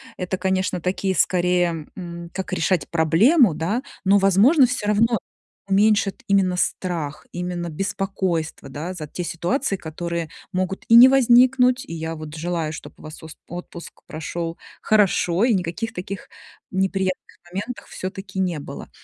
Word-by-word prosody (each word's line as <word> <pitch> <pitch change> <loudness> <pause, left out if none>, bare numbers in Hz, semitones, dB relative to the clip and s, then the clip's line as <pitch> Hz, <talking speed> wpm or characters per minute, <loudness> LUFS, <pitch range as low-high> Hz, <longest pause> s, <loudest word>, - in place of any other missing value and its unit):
это, 185 0 -3
конечно, 190 -1 0
такие, 190 +2 -1
скорее, 175 -4 +1
м, 170 -2 -7
как 190 0 -4
решать 185 -3 +1
проблему, 180 - +4
да, 175 - -1 0.2
но, 200 +2 +5
возможно, 205 - +5
всё 240 -4 -3
равно 230 +3 +3 0.5
уменьшат 205 +2 +2
именно 190 -2 +2
страх, 170 -5 -2
именно 175 -1 -4
беспокойство, 185 -4 -3
да, 160 +7 -5
за 155 -4 -7
те 180 - -5
ситуации, 195 - -1
которые 170 0 -4 0.2
могут 185 +1 -2
и 230 - +5
не 240 +2 +11
возникнуть. 255 0 +5
И - - -9
я 160 0 -4
вот 155 -1 -8
желаю, 165 -1 -2
чтоб 155 - -9
у - - -15
вас 155 +1 -9
с - - -15 0.2
отпуск 175 0 -9
прошёл 165 +1 -5 0.2
хорошо, 200 -2 +3
и 245 - +4
никаких 180 +5 -3
таких 185 +2 -7 0.4
неприятных 190 -1 0 0.4
моментов 205 +7 -5
всё-таки 190 0 -7
не 180 -4 0
было. 145 - -9
185 Hz, 145 wpm, -22 LUFS, 170-200 Hz, 0.5 s, не